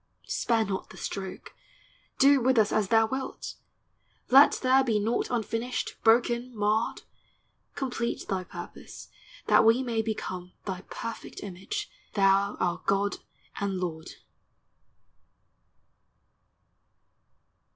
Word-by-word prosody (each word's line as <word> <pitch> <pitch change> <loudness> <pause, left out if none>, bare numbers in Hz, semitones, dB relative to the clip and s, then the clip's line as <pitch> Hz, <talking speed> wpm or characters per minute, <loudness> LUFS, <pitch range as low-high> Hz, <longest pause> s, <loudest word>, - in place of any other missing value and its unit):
Spare 225 -2 +1
not 190 -2 -4
the - - -13
stroke! 190 -2 -6 0.6
do 275 0 +6
with 260 +1 +3
us 215 -2 +4
as 215 -2 +1
thou 225 +2 +4
wilt! 265 +4 -5 0.8
Let 275 +3 +8
there 260 +1 +3
be 230 -5 +1
naught 220 +3 0
unfinished, 235 +1 -2
broken, 235 +1 +2
marred; 210 +2 0 0.7
Complete 245 -3 -3
thy 190 -1 -1
purpose, 175 0 -10 0.4
that - - +5
we 230 +4 +4
may 230 -3 0
become 185 -5 -5
Thy 185 -2 -4
perfect 230 0 -7
image, 205 - -5 0.3
thou 195 0 +3
our 175 -1 0
God 200 +1 +1 0.4
and 195 -2 -1
Lord 160 -3 -5
220 Hz, 110 wpm, -28 LUFS, 195-245 Hz, 0.8 s, Let